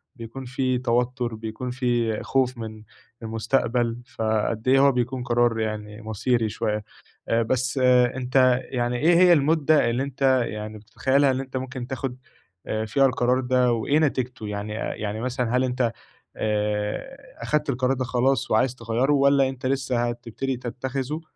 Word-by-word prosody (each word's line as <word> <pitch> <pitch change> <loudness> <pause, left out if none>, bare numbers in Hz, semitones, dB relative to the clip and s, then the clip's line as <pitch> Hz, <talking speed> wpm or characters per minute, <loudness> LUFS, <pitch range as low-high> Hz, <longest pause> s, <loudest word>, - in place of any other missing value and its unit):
بيكون 115 +3 -8
في 130 0 0
توتر 125 -1 0
بيكون 110 +3 -5
في 120 -3 0
خوف 130 -1 0
من 110 -1 -7 0.4
المستقبل، 115 +1 0 0.2
فقد 110 +1 -1
إيه 135 +1 +5
هو 140 0 +6
بيكون 125 0 -2
قرار 120 -1 +2
يعني 105 0 -4
مصيري 110 +1 0
شوية، 105 0 -2 0.5
آآ 115 0 +2
بس 130 +4 0 0.4
أنت 130 0 +3
يعني 120 -1 -1
إيه 165 +6 +4
هي 180 +1 +6
المدة 155 -3 +3
اللي 120 +3 0
أنت 140 0 -6 0.2
يعني 105 0 -6
بتتخيلها 130 +6 +1
اللي 130 0 -1
أنت 130 0 -8
ممكن 130 -1 -5
تاخد 130 -1 -4 0.7
فيها 135 +5 +3
القرار 125 0 +1
ده 125 -1 +2
وإيه 120 +6 +1
نتيجته 130 -7 -1
يعني، 105 +1 -4
يعني 110 -1 -4
مثلًا 125 0 -1
هل 130 - +2
أنت 125 -2 0 0.4
آآ 105 - -2 0.3
أخدت 150 -1 0
القرار 130 0 +1
ده 130 - -2
خلاص 130 +1 +1
وعايز 125 +3 +2
تغيّره 120 +4 0
والّا 140 -1 +4
أنت 130 -1 -8
لسه 130 -3 0
هتبتدي 120 +2 -4
تتخذه 130 +5 -4
125 Hz, 150 wpm, -24 LUFS, 115-130 Hz, 0.7 s, هو